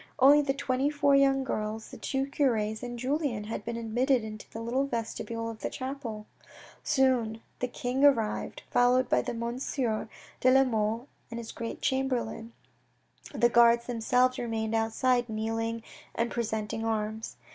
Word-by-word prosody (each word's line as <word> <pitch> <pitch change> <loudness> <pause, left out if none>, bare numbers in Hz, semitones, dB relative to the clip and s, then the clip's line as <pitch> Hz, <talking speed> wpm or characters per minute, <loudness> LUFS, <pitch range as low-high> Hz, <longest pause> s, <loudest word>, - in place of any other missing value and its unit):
Only 285 +2 +7
the 270 -2 -1
twenty 275 0 0
four 285 -1 +2
young 270 -1 +4
girls, 220 -3 -3
the - - -9
two 270 0 -1
cures 225 -7 0
and 245 -1 -5
Julien 260 -3 -1
had 210 -1 -5
been 230 +1 -4
admitted 240 +2 +1
into 215 -1 -8
the 225 - -7
little 250 +4 0
vestibule 230 -1 -3
of 225 -1 -6
the - - -3
chapel. 255 -5 -5 0.6
Soon 255 -6 +2 0.2
the 250 - 0
king 250 +2 -2
arrived, 235 -7 +2
followed 245 +1 +4
by 125 - +3
Monsieur 235 - -2 0.3
de 255 - +4
la 265 +1 +6
Mole 225 0 -1 0.2
and 230 - -6
his 230 -1 -6
great 230 0 -6
Chamberlain. 250 -4 -1 0.8
The 240 -4 +3
guards 235 0 +5
themselves 250 +2 +2
remained 225 -2 -2
outside 240 +2 +1
kneeling 225 +1 -2 0.3
and 230 +1 0
presenting 220 -1 -2
arms. 220 0 -2
235 Hz, 150 wpm, -29 LUFS, 225-260 Hz, 0.8 s, Only